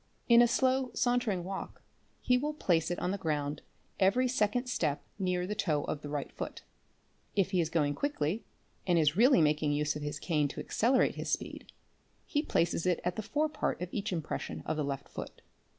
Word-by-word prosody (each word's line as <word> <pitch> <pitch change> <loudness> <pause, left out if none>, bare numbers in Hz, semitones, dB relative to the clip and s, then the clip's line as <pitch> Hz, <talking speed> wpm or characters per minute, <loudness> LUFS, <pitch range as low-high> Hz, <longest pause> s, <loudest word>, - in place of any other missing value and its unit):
In 235 -1 +8
a 240 - +6
slow 260 +1 +2
sauntering 245 -7 +1
walk 190 +2 -6 0.4
he 250 - +3
will 295 +4 -1
place 170 - +1
it 175 - -2
on 180 - -1
the 200 - -3
_ - - -24
ground 145 -2 -1 0.4
every 220 +7 +4
second 245 0 +1
step 155 - -1 0.2
near 180 -1 0
the 205 - -2
toe 160 -9 0
of 150 - -3
the 145 - -7
right 145 -1 -3
foot. - - -6 0.7
If 195 -2 +2
he 185 -3 +3
is 160 - -1
going 150 -4 +1
quickly 215 - -1 0.4
and 175 -2 +4
is 155 -1 +3
really 240 - +6
making 150 -1 +2
use 150 0 0
of 150 - -5
his 150 0 -3
cane 150 -2 +1
to - - -7
accelerate 250 +4 +2
his - - -4
speed - - -3 0.5
he 295 - 0
places 170 - 0
it 180 -2 +2
at 180 0 -1
the 220 - -2
fore 295 +8 0
part 300 0 -2
of 180 0 -4
each 210 -1 -2
impression 165 -4 -4
of 155 - -1
the 155 - -1
left 140 -1 -4
foot. - - -8
180 Hz, 205 wpm, -31 LUFS, 150-240 Hz, 0.7 s, In